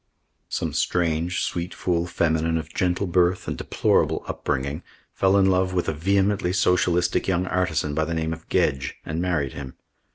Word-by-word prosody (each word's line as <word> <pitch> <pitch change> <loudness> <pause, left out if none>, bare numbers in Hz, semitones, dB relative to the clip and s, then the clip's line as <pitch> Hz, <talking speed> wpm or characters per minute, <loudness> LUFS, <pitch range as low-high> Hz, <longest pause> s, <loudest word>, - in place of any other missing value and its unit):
Some - - -2
strange, 85 0 0
sweet 85 +1 -3
fool 85 -1 0
feminine 80 -1 +1
of 80 0 -6
gentle 90 +2 0
birth 90 0 +1
and - - -2
deplorable - - +1
upbringing 70 +5 -2 0.3
fell 95 +1 +3
in 95 - +5
love 95 0 +2
with 90 - 0
a 80 - 0
vehemently 95 +3 +1
socialistic 90 -2 +2
young 90 -1 +1
artisan 80 -5 0
by 80 +1 +1
the 85 - -3
name 80 0 -1
of 80 0 -11
Gedge 65 -1 0
and 80 +2 -3
married 85 -7 -1
him. 65 -2 -8
85 Hz, 165 wpm, -24 LUFS, 80-90 Hz, 0.3 s, in